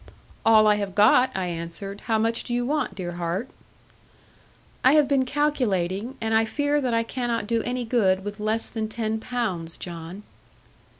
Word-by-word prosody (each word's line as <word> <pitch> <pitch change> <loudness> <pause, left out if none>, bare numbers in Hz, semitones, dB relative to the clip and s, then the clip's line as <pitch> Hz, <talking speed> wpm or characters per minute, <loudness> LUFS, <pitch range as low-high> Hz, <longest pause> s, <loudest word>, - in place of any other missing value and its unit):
'All 220 -1 +6
I 210 -1 +4
have 200 -2 -4
got,' 230 +5 +5
I 190 - -1
answered; 175 +4 -5
'how 225 -1 +2
much 230 +1 0
do 240 - -3
you 245 0 0
want, 295 0 -1
dear 175 -2 -4
heart?' 175 +7 -3 1.3
'I 260 - +6
have 300 -2 +5
been 275 -2 +2
calculating; 245 -6 -1
and 225 -1 -1
I 220 0 +4
fear 290 +5 0
that 255 -3 0
I 230 - +2
cannot 235 -2 -2
do 230 +1 0
any 245 +1 -3
good 195 -5 +2
with 205 +1 -6
less 215 +2 0
than 220 -2 -4
ten 220 -1 -2
pounds, 200 -10 -3
John.' 170 +3 -7
220 Hz, 175 wpm, -25 LUFS, 195-245 Hz, 1.3 s, All